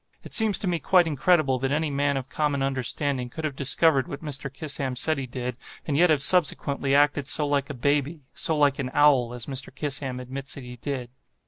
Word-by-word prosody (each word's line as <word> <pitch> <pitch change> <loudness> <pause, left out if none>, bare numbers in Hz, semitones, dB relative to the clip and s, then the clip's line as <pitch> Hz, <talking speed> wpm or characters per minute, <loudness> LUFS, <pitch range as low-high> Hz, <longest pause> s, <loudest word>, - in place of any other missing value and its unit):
It - - -8
seems 220 -3 +5
to 200 - -4
me 175 -2 0
quite 180 0 +3
incredible 155 -3 +1
that 135 +1 -2
any 150 +1 -1
man 140 0 0
of 130 -1 -5
common 145 -2 -1
understanding 135 0 -1
could 160 +6 -8
have 150 -3 -3
discovered 140 0 +3
what 145 - -8
Mr. 140 -2 -3
Kissam 135 -2 -3
says 155 +5 +2
he 135 -2 -5
did, 125 -1 -5 0.3
and 145 - -2
yet 175 +4 +4
have 150 -3 +2
subsequently 140 -5 +3
acted 145 -1 +2
so 150 - +2
like 145 0 -1
a 145 - -6
baby—so 145 +3 -1
like 145 -1 +2
an 130 -2 -3
owl—as 125 -5 +2
Mr. 135 -1 -2
Kissam 135 -2 -4
admits 135 +2 -6
that 140 - -9
he 125 0 -10
did. 125 -1 -5
140 Hz, 205 wpm, -25 LUFS, 130-150 Hz, 0.3 s, seems